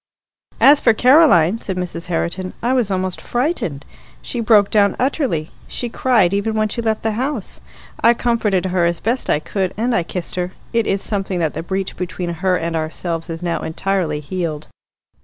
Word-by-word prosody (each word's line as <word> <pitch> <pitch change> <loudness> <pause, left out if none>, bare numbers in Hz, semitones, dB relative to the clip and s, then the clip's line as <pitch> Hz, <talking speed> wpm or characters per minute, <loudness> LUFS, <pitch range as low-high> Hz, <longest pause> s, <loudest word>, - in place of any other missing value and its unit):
"As 285 +1 +7
for 230 -5 +4
Caroline," 235 - +5
said 190 -4 -4
Mrs. 170 -2 -4
Herriton, 180 +2 -2
"I 245 +2 +2
was 245 -5 +1
almost 185 -1 -2
frightened. 240 - -2 0.4
She 245 - -4
broke 215 -3 +4
down 200 -2 +3
utterly. 255 - -1 0.2
She 240 - -3
cried 225 -7 +2
even 205 +2 0
when 215 0 +1
she 235 - -3
left 220 -1 -1
the 220 - +1
house. 245 0 -3 0.4
I 235 +1 +5
comforted 220 -6 +1
her 185 -1 +1
as 170 0 0
best 240 +4 -1
I - - +4
could, 185 +4 -3
and 240 +3 0
I - - +3
kissed 175 +1 -6
her. 180 +1 -2 0.2
It 230 -1 +1
is 195 0 0
something 195 -3 -2
that 160 -3 0
the 160 - -4
breach 190 +2 -3
between 180 -1 -4
her 190 -1 +2
and 165 0 -3
ourselves 165 +1 -3
is 165 +1 -5
now 170 -1 -1
entirely 160 -2 -1
healed." 155 -2 -4
190 Hz, 185 wpm, -19 LUFS, 170-230 Hz, 0.4 s, As